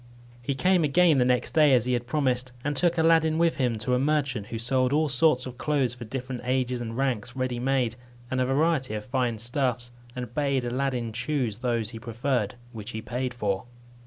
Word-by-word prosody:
He 135 +3 -2
came 180 +5 +3
again 155 0 +4
the 125 - +4
next 125 -1 +1
day, 150 -4 +6
as 120 -2 +2
he 125 - 0
had 120 0 -1
promised, 130 -3 0
and 145 0 -1
took 170 +3 +2
Aladdin 160 -1 +4
with 170 0 +2
him 125 -4 +1
to 110 +4 -1
a 125 - +3
merchant, 135 -7 0
who 115 - -5
sold 125 +2 +1
all 155 +1 +3
sorts 135 -1 +3
of 125 -1 -8
clothes 140 -5 +1
for 120 -1 -8
different 125 +1 -5
ages 125 -1 0
and 115 0 -5
ranks, 125 -3 -1
ready 130 -2 -2
made, 125 -2 +1 0.4
and 130 0 +1
a - - +2
variety 135 -4 +1
of 105 0 -5
fine 125 -3 0
stuffs, 120 +1 -1 0.2
and 125 -2 -6
bade 140 -3 0
Aladdin 125 -2 -2
choose 125 -4 -2
those 120 -3 -1
he 115 - -8
preferred, 120 -1 -1 0.2
which 110 -2 -8
he 110 - -4
paid 125 +1 -3
for. 100 -6 -2
125 Hz, 205 wpm, -26 LUFS, 120-140 Hz, 0.4 s, day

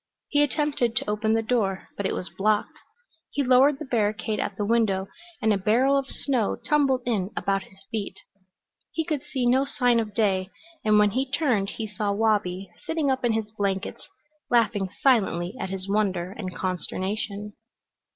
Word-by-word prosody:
He 290 - +3
attempted 290 -5 +1
to - - 0
open 215 +1 +1
the 225 0 +2
door, 215 -5 0
but 200 - -1
it - - -2
was 180 - -4
blocked. 210 +1 0 0.5
He 285 - -1
lowered 265 +2 +5
the 305 - -6
barricade 215 -3 0
at 195 - -3
the 205 - -1
window, 205 -4 +2 0.4
and 220 -1 +4
a 200 - 0
barrel 245 +8 +3
of 275 -1 0
snow 255 -8 0
tumbled 275 -4 +2
in 205 -6 0
about 195 0 +1
his 190 0 -18
feet. 215 -3 -3 0.7
He 320 - -2
could 305 -4 -1
see 265 -3 -2
no 255 +3 +4
sign 245 -4 +2
of 210 -3 -3
day, 190 -4 +1 0.3
and 215 -1 +4
when 210 -1 +5
he 260 +4 -1
turned 250 -9 +1
he 225 - -2
saw 210 -1 -2
Wabi 200 -3 +1 0.2
sitting 320 -4 0
up 260 -1 -1
in 240 -2 +2
his 220 -1 -2
blankets, 200 -2 -3 0.4
laughing 215 -5 +2
silently 195 -8 +3
at - - -3
his 190 0 -4
wonder 190 -3 0
and 190 -3 -6
consternation. 200 +3 -3
215 Hz, 175 wpm, -26 LUFS, 195-255 Hz, 0.7 s, lowered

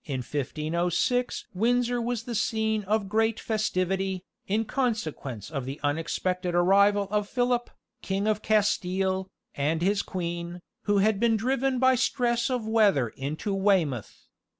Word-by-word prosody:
In 135 -3 -3
1506 165 - -1
Windsor 240 +4 +1
was 235 -1 -2
the 240 - -5
scene 220 -1 0
of 210 0 0
great 220 +2 +1
festivity, 190 -3 -1 0.2
in 215 +3 +1
consequence 160 - -3
of 135 -5 -3
the 135 +3 -6
unexpected 175 +4 -1
arrival 200 +3 +4
of 210 -1 0
Philip, 245 -1 0 0.3
King 195 +1 -1
of 215 -1 +1
Castile, 190 -2 +1 0.2
and 155 +4 0
his 200 +2 +2
queen, 175 -1 -5 0.2
who 205 -1 +2
had 200 0 +3
been 230 -1 +3
driven 260 +3 0
by 260 +1 +5
stress 240 -1 +1
of 245 -4 -2
weather 205 - +3
into 150 - -4
Weymouth. 185 - 0
200 Hz, 135 wpm, -27 LUFS, 175-225 Hz, 0.3 s, by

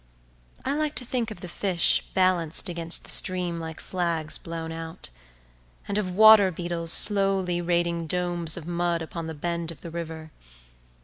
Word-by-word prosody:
I 270 - -1
like 305 0 -2
to 250 - -4
think 240 -1 -3
of 215 - -10
the 180 - -7
fish 175 -1 +1
balanced 185 -3 +1
against 170 -1 +2
the - - -1
stream 180 -2 +2
like 160 -1 -8
flags 170 -4 -2
blown 165 -1 -7
out; 165 - -9 0.8
and 200 - -4
of 185 -3 -5
water 215 -2 +7
beetles 170 -1 0
slowly 195 -4 +5
raiding 170 -1 -2
domes 175 -1 -1
of 165 - -9
mud 175 -1 -2
upon 165 0 -7
the 160 - -7
bed 170 +2 -4
of 165 -4 -10
the 170 - -9
river. 160 -1 -8
175 Hz, 165 wpm, -24 LUFS, 165-185 Hz, 0.8 s, water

